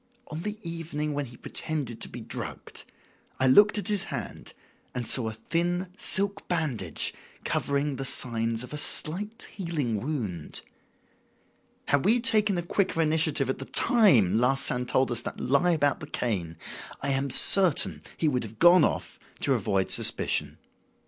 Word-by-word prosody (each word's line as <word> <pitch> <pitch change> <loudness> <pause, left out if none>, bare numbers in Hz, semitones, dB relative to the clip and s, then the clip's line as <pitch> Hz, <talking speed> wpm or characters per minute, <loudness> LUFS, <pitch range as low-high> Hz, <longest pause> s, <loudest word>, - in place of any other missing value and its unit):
On 155 +2 -6
the 210 +3 -5
evening 160 -3 -5
when 145 -1 -4
he 120 0 -15
pretended 140 -8 -4
to - - -4
be - - -9
drugged - - -8 0.5
I 130 - +2
looked 205 +11 +5
at 205 - -3
his 205 -3 0
hand - - -8 0.4
and 125 -1 -3
saw 115 0 +4
a 110 - -9
thin 175 - -3
silk 200 0 +1
bandage 130 - -2 0.3
covering 140 -1 -2
the 135 - -5
signs 115 -2 -1
of 125 - -11
a 150 - -4
slight 205 +11 -1
healing 150 - -4
wound. 110 - -5 1.3
Had 140 -1 +2
we 230 +5 +3
taken 215 -5 +3
a 175 - -3
quicker 185 0 -2
initiative 155 -3 +1
at 130 - -3
the 135 - -7
time 130 - +3
Larsan 125 0 +2
told 130 0 0
us 120 -1 0
that - - -8
lie 140 +8 +1
about 145 -5 0
the 155 - -9
cane, 90 - -4 0.5
I 140 - -1
am 135 0 -1
certain 185 +3 +6 0.2
he 160 - -1
would 130 -4 0
have 110 -1 -9
gone 175 +7 +5
off, - - -3 0.2
to 140 - +1
avoid 100 -5 -1
suspicion. - - +3
145 Hz, 160 wpm, -26 LUFS, 120-175 Hz, 1.3 s, certain